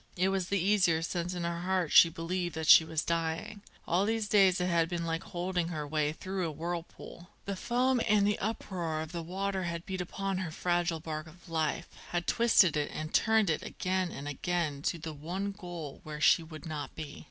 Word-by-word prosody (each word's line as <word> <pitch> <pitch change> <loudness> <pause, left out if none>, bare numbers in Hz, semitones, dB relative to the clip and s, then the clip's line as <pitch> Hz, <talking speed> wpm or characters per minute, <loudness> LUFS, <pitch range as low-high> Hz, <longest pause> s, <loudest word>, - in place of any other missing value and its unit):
It 185 +2 +3
was 190 -2 -1
the 200 - +1
easier 180 -4 +3
since 175 +1 -2
in 175 - -3
her 170 0 -2
heart 185 -3 0
she 165 - +8
believed 175 +1 -3
that 160 0 -3
she 160 - +9
was 160 -1 -2
dying. 170 +6 -2 0.3
All 180 +3 +2
these 220 0 0
days 195 -3 +5
it 180 - +1
had 170 -2 +2
been 170 -1 -2
like 165 0 -1
holding 180 -1 -2
her 155 -4 -4
way 150 0 0
through 185 +2 -3
a - - -3
whirlpool. 170 +2 -6 0.2
The 200 - -3
foam 250 +5 +1
and 210 -1 +4
uproar 180 -7 -2
of 160 0 -6
the 170 -1 -4
water 190 +2 -2
had 170 0 -4
beat 185 -1 -3
upon 195 +1 -3
her 185 -3 -3
fragile 175 0 0
bark 155 0 -5
of 175 +4 -16
life, 160 -2 -1 0.2
had 175 0 -1
twisted 220 -8 +4
it 150 -1 0
and 155 +1 -5
turned 220 -5 +4
it 155 - -1
again 185 -1 -2
and 140 - -7
again 150 0 -2
to - - -4
the 160 0 -6
one 180 +7 -4
goal 175 -7 -8
where 150 -1 -7
she 150 - +5
would 155 -2 -10
not 150 -4 -5
be. 150 -2 -7
175 Hz, 210 wpm, -31 LUFS, 160-190 Hz, 0.3 s, she